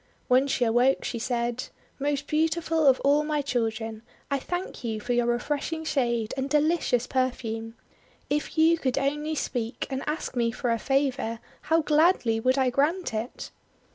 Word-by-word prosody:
When 255 +2 +4
she 260 -3 +1
awoke, 245 +4 +3
she 235 - -3
said: 240 +1 -1 0.2
— - - -35
:*Most 285 0 -1
beautiful 320 0 +1
of 265 -1 +5
all 290 +2 +3
my 300 -1 -1
children, 225 -4 -2 0.3
I 280 - +1
thank 355 0 -5
you 220 -2 -2
for 245 +3 -2
your 240 0 +2
refreshing 295 +6 -1
shade 235 -7 0
and 270 +1 -2
delicious 300 -4 +2
per 255 0 +1
fume. 225 -2 -6 0.5
If 295 +2 -2
you 325 +1 +5
could 260 -4 -1
only 295 +3 -1
speak, 240 -4 -3
and 265 0 -2
ask 300 -3 -3
me 235 -1 +1
for 245 0 -2
a 230 - +1
favour, 270 -4 0 0.3
how 325 0 +4
gladly 300 -7 +3
would 255 +4 +2
I 260 -2 +2
grant 310 +5 +1
it!' 220 +3 -5
265 Hz, 170 wpm, -27 LUFS, 240-300 Hz, 0.5 s, of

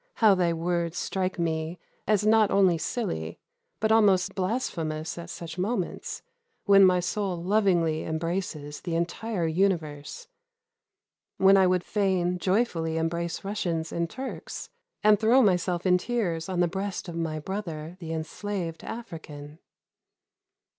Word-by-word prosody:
how 215 -3 +6
thy 180 -2 +2
words 170 0 -1
strike 185 +1 -2
me 160 0 -2 0.3
as 210 -1 +2
not 215 -1 +5
only 190 -3 +4
silly, 80 - -3 0.4
but 220 0 +1
almost 200 -5 +4
blasphemous 165 -7 -2
at 170 0 -8
such 170 0 -7
moments, 190 -1 -3 0.4
when 200 -2 +7
my 185 -1 +5
soul 185 +1 -2
lovingly 175 -5 +2
embraces 160 -2 -3
the 170 -2 -3
entire 175 +3 -1
universe, 160 -4 -1 1.1
when 195 +1 +6
I 190 -1 +5
would 180 -1 +2
fain 185 -3 0
joyfully 180 -5 0
embrace 170 +2 -2
Russians 175 -5 -2
and 170 0 -1
Turks, 260 +6 -7 0.3
and 210 -1 +6
throw 235 +4 +5
myself 180 -3 +1
in 180 -1 +4
tears 180 -8 -2
on 180 -1 0
the 175 - +4
breast 195 +2 -4
of 170 - -6
my 165 -2 -2
brother 165 -2 -5
the 165 -3 -6
enslaved 165 +2 -4
African!" 155 -9 -8
180 Hz, 135 wpm, -27 LUFS, 165-200 Hz, 1.1 s, when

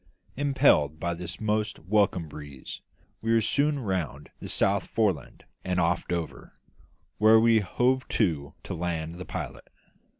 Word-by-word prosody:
Impelled 130 - +3
by 85 +1 -1
this 90 +1 -7
most 110 0 -1
welcome 95 -2 +1
breeze, 75 -2 -9 0.4
we 115 - 0
were 115 - +5
soon 145 +7 +2
round 90 - -3
the - - -7
South 100 0 +1
Foreland 100 - -1 0.2
and 90 -1 0
off 85 0 +1
Dover, 85 -2 -4 0.7
where 110 +1 +7
we 115 0 +5
hove 125 +6 +1
to 80 -10 0
to - - -5
land 85 0 -3
the 90 - -6
pilot. - - -6
95 Hz, 140 wpm, -27 LUFS, 85-110 Hz, 0.7 s, where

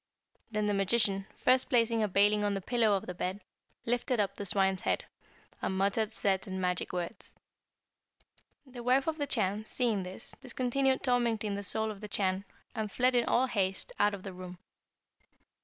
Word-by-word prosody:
Then 210 -1 -1
the 205 - +1
magician, 195 -1 +1
first 255 0 +3
placing 230 -3 +3
a 215 - +2
baling 205 +2 +3
on 205 -1 +1
the - - -1
pillow 220 -1 +2
of 190 - -7
the 180 - -5
bed, 185 +2 -3 0.5
lifted 245 0 0
up 200 -1 0
the 200 - -5
swine's 190 0 +2
head, - - 0 0.6
and 190 - -1
muttered 200 +3 +1
certain 190 -2 -1
magic 180 -1 -1
words. 180 +4 -5 1.3
"The 255 -2 -9
wife 255 +3 +3
of 320 -1 -2
the 285 - -1
Chan 215 -4 0
seeing 225 -4 +1
this 185 +4 -6
discontinued 260 +1 0
tormenting 235 -5 +1
the 200 - -3
soul 220 +2 0
of 205 -1 -10
the 210 - -6
Chan, 195 -1 0 0.3
and 215 -2 -3
fled 255 +3 +2
in 240 -1 +3
all 255 - +3
haste 195 -6 -1
out 205 0 +3
of 190 - -11
the 195 - -6
room. 180 0 -9
210 Hz, 175 wpm, -31 LUFS, 195-240 Hz, 1.3 s, first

